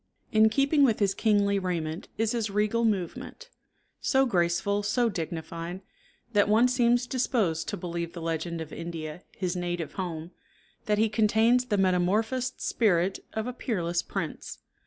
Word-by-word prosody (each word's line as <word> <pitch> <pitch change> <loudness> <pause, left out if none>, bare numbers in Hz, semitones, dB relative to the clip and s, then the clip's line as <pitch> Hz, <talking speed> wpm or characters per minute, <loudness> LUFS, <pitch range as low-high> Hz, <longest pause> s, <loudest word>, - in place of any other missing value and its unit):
In 220 0 +5
keeping 280 +4 +3
with 230 -5 +4
his 200 -2 +2
kingly 200 -2 +2
raiment 170 -3 -3
is 225 0 +1
his 230 -3 -1
regal 210 +3 +1
movement; 215 - -3 0.5
so 270 0 +3
graceful, 185 -1 +1
so 220 +4 +1
dignified, 170 0 -5 0.5
that 205 -1 +3
one 225 +4 +5
seems 245 -1 +2
disposed 225 -11 0
to - - -3
believe 170 -1 -4
the 175 - -7
legend 165 0 -2
of 160 - -8
India, 165 -1 -6 0.2
his 185 -2 -2
native 175 -2 -3
home, 170 -3 -5 0.6
that 210 -1 +2
he 220 +1 +3
contains 220 +3 +3
the 210 -4 0
metamorphosed 210 +8 +1
spirit 190 -4 +1
of 220 0 -2
a 250 - -4
peerless 175 -9 -1
prince. - - -5
200 Hz, 150 wpm, -28 LUFS, 170-225 Hz, 0.6 s, In